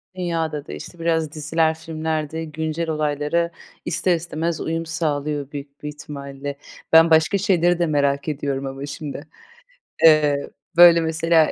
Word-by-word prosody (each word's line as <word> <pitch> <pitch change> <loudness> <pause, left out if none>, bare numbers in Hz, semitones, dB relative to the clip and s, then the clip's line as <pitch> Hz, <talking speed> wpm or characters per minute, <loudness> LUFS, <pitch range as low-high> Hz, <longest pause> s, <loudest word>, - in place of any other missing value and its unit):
Dünya 165 -3 -1
da 150 -1 -6
değişti. 175 - -9
Biraz 160 -2 0
diziler, 160 +1 +1
filmler 160 -1 -3
de 160 0 -4
güncel 160 +2 -3
olaylara 155 +2 0 0.3
ister 175 +2 +1
istemez 165 0 -3
uyum 165 +1 -2
sağlıyor 150 -3 -2
büyük 140 0 -9
bir - - -4
ihtimalle. 140 -1 -7 0.4
Ben 165 +1 +8
başka 160 +5 +4
şeyleri 175 -3 +2
de 175 - +3
merak 140 -2 0
ediyorum 140 -2 -2
ama 135 +1 -5
şimdi. 145 0 -7 0.8
Eee, 150 -3 +5 0.3
böyle, 170 -1 +9
mesela 160 0 +2
160 Hz, 140 wpm, -22 LUFS, 145-165 Hz, 0.8 s, böyle